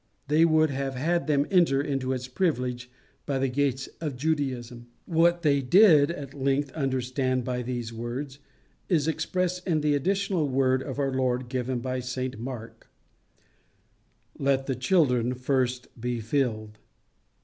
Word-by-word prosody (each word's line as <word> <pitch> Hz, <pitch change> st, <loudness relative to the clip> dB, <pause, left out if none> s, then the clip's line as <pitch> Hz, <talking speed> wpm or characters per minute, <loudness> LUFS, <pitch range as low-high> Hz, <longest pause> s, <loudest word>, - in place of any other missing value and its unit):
They 155 Hz, +3 st, +5 dB
would 155 Hz, -2 st, +3 dB
have 135 Hz, 0 st, -3 dB
had 170 Hz, +6 st, 0 dB
them 145 Hz, -1 st, +2 dB
enter 170 Hz, -8 st, +4 dB
into 135 Hz, -2 st, -1 dB
its 130 Hz, -1 st, -3 dB
privileges 125 Hz, -5 st, -1 dB, 0.4 s
by 140 Hz, -2 st, 0 dB
the 135 Hz, 0 st, 0 dB
gates 135 Hz, 0 st, 0 dB
of 150 Hz, -5 st, -3 dB
Judaism. 125 Hz, -5 st, -2 dB, 0.2 s
What 170 Hz, +1 st, +2 dB
they 140 Hz, -2 st, +3 dB
did 155 Hz, 0 st, +6 dB
at 145 Hz, -5 st, -6 dB
length 140 Hz, 0 st, 0 dB
understand 130 Hz, -2 st, -1 dB
by 125 Hz, -1 st, -2 dB
these 120 Hz, -2 st, -4 dB
words 130 Hz, +4 st, -5 dB, 0.5 s
is 160 Hz, -5 st, +2 dB
expressed 180 Hz, +3 st, -1 dB
in 160 Hz, -4 st, +1 dB
the 150 Hz, 0 st, +2 dB
additional 185 Hz, +1 st, 0 dB
word 130 Hz, 0 st, +2 dB
of 135 Hz, -1 st, -6 dB
our 135 Hz, -2 st, 0 dB
Lord 130 Hz, -1 st, 0 dB
given 125 Hz, -1 st, -2 dB
by 130 Hz, 0 st, -2 dB
St 125 Hz, -1 st, -4 dB
Mark: 115 Hz, -2 st, -8 dB, 1.5 s
"Let 135 Hz, -1 st, +1 dB
the 135 Hz, -, -1 dB
children 125 Hz, -3 st, +2 dB
first 125 Hz, -1 st, -1 dB
be 120 Hz, 0 st, -2 dB
filled." 110 Hz, -3 st, -2 dB
135 Hz, 145 wpm, -27 LUFS, 125-150 Hz, 1.5 s, did